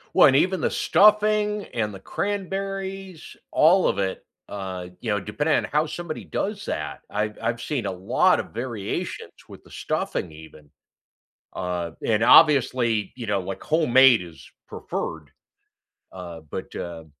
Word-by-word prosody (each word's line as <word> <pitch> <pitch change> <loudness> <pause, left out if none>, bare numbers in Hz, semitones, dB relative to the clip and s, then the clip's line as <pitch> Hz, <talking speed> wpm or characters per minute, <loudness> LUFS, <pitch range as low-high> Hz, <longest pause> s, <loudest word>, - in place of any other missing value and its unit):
Well, - - +8
and 135 - +4
even 185 +5 +2
the - - +1
stuffing 210 0 +3
and 105 -3 -2
the 95 - -9
cranberries, 195 - -4 0.2
all 175 +4 +5
of - - 0
it. 95 -1 -2 0.2
Uh, 95 -3 -6
you 115 - -5
know, 105 - +2
depending 125 +11 0
on - - +1
how 150 +2 +2
somebody 165 0 -6
does 205 0 -3
that, - - -4
I've 105 0 -2
I've 120 0 -2
seen 135 -8 -3
a 95 - -1
lot 95 +1 +2
of - - -14
variations 115 -3 -4 0.2
with - - -13
the - - -19
stuffing 90 - -3
even, 75 -1 -14 0.9
uh, 90 -2 -3
and 110 0 +2
obviously, 125 -8 +5
you 120 -2 -6
know, 100 -2 0
like 95 +1 -6
homemade 135 - +5
is 85 -3 -11 0.2
preferred, 80 -3 -5 0.8
uh, 85 -3 -9
but, - - -7
uh, 85 -2 -6
120 Hz, 150 wpm, -24 LUFS, -, 0.9 s, Well